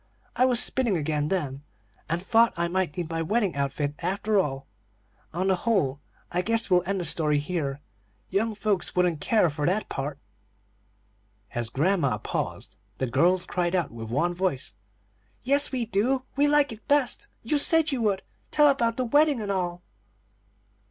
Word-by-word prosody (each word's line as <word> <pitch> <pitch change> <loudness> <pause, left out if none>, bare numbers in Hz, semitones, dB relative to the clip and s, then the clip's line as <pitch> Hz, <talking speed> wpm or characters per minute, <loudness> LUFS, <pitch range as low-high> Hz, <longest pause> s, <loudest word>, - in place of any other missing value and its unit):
I 255 - +4
was 250 -2 +3
spinning 240 -7 +1
again 150 -1 -1
then, 145 -7 -2 0.5
and 165 +1 0
thought 230 +1 +4
I 170 0 +1
might 180 -3 -1
need 175 -2 -2
my 165 0 -1
wedding 200 +1 0
outfit, 140 +1 -1
after 205 +2 0
all 135 -6 -2 0.7
On 180 +3 -2
the 190 -1 +3
whole, 175 - 0 0.3
I 180 - +1
guess 225 +1 -1
we'll 180 -1 +5
end 195 0 0
the 175 - -2
story 150 -1 +1
here; 145 -3 -3 0.5
young 215 +3 0
folks 205 -3 -1
wouldn't 175 -4 +1
care 215 -1 +3
for 145 0 -2
that 195 +4 0
part." 135 +1 -4 1.4
As 120 -1 -2
grandma 145 - +1
paused, - - -4 0.2
the 130 - -1
girls 170 +9 +2
cried 175 0 -1
out 175 - 0
with 115 -1 -8
one 145 +9 0
voice: 175 - -2 0.7
"Yes, 280 +3 +2
we 250 -3 -1
do! 240 +5 0
we 285 +2 +4
like 290 -2 +4
it 220 -1 -11
best. 285 -3 +1 0.2
You 290 +6 +1
said 320 +1 +4
you 265 -3 -1
would. 200 -3 0 0.3
Tell 295 -1 +5
about 235 -4 +1
the 255 - 0
wedding 290 +2 +3
and 205 -2 -3
all." 180 -2 -2
185 Hz, 170 wpm, -26 LUFS, 150-230 Hz, 1.4 s, we'll